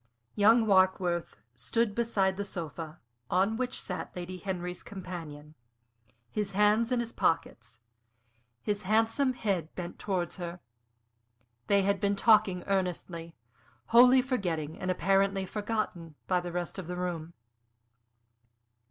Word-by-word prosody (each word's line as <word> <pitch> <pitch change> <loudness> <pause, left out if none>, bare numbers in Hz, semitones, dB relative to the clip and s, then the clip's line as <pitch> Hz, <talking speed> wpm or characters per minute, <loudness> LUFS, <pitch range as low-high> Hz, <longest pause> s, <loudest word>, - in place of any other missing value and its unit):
Young 220 +3 +5
Warkworth 185 -3 +2 0.2
stood 205 - 0
beside 205 -4 +1
the 200 - -3
sofa, 165 -3 -6 0.3
on 195 +4 +2
which 255 +1 -2
sat 180 - -5
Lady 180 +1 -5
Henry's 180 -2 -4
companion, 165 -6 -8 0.8
his 205 -2 -2
hands 210 +4 +3
in 250 - +2
his 235 -1 -3
pockets, 120 - -1 0.8
his 205 0 -1
handsome 225 +6 +2
head 195 -9 -1
bent 175 -1 -6
towards 185 -4 -2
her. 175 -1 -6 1.1
They 200 -1 +4
had 200 0 +1
been 200 -1 +1
talking 210 -4 +4
earnestly, 180 -3 -2 0.5
wholly 250 +2 +7
forgetting 175 - -2
and 185 - -3
apparently 195 +1 +2
forgotten 205 -6 -3
by 180 -1 +2
the 175 0 -5
rest 175 +2 -4
of 180 - -7
the 180 - -4
room. 170 -2 -4
190 Hz, 125 wpm, -30 LUFS, 175-210 Hz, 1.1 s, wholly